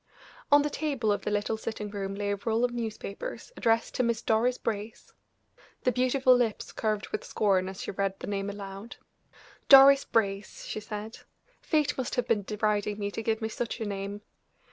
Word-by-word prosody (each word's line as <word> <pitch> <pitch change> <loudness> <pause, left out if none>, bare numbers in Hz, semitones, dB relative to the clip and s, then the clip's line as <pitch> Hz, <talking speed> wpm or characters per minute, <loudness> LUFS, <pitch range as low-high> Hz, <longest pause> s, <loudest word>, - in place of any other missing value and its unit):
On 290 0 +7
the 295 - -2
table 275 -9 -1
of 205 - 0
the - - -2
little 210 +1 -1
sitting 215 -2 -5
room 195 -1 -4
lay 205 0 -2
a - - +1
roll 230 +1 +2
of 245 - -2
newspapers, 230 - -5
addressed 230 0 +1
to - - 0
Miss 235 -1 0
Doris 235 +3 +2
Brace. 215 0 -5 0.7
The 250 - +3
beautiful 255 +1 +4
lips 235 -4 -1
curved 215 -2 -2
with - - -3
scorn 190 -3 +1
as 190 +1 -7
she - - -4
read 195 0 -2
the - - -6
name 200 0 -2
aloud. 200 +2 -8 0.7
"Doris 275 0 +9
Brace!" 200 -2 -1
she - - -4
said. 215 +1 -7 0.4
"Fate 300 -4 +1
must 255 - -2
have 245 -1 0
been 225 -3 +2
deriding 210 0 -1
me 205 -1 -3
to 225 - -4
give 225 0 -1
me 220 - -1
such 235 +1 -4
a 225 - -2
name." 200 0 -4
220 Hz, 190 wpm, -28 LUFS, 205-240 Hz, 0.7 s, Doris